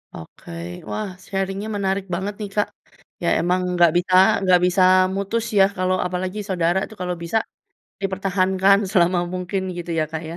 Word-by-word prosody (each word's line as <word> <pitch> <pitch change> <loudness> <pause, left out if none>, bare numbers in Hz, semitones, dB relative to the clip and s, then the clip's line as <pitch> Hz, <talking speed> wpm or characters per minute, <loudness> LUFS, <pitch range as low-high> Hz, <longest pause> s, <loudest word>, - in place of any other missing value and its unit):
Oke, 80 - -12 0.4
wah 215 -1 -3 0.2
sharing 195 0 -3
nya 215 - -5
menarik 195 -1 -1
banget 200 +3 -3
nih, 205 -2 -5
Kak. 210 - +2 0.6
Ya - - 0
emang 180 +2 +1
nggak 175 -2 +5
bisa 185 +1 -1 0.3
nggak 180 -1 +5
bisa 180 +1 +2 0.3
mutus 215 +4 -2
ya - - +8
kalau 185 0 +1
apalagi 185 +3 -4
saudara 175 0 +1
tuh 220 - -14
kalau 180 -1 -2
bisa 195 +7 0 0.7
dipertahankan 190 0 +2
selama 180 -2 +3 0.2
mungkin 185 +1 -3
gitu 175 0 -6
ya, 155 - +2
Kak, 160 - -4
ya? 170 - -7
185 Hz, 170 wpm, -22 LUFS, 180-195 Hz, 0.7 s, ya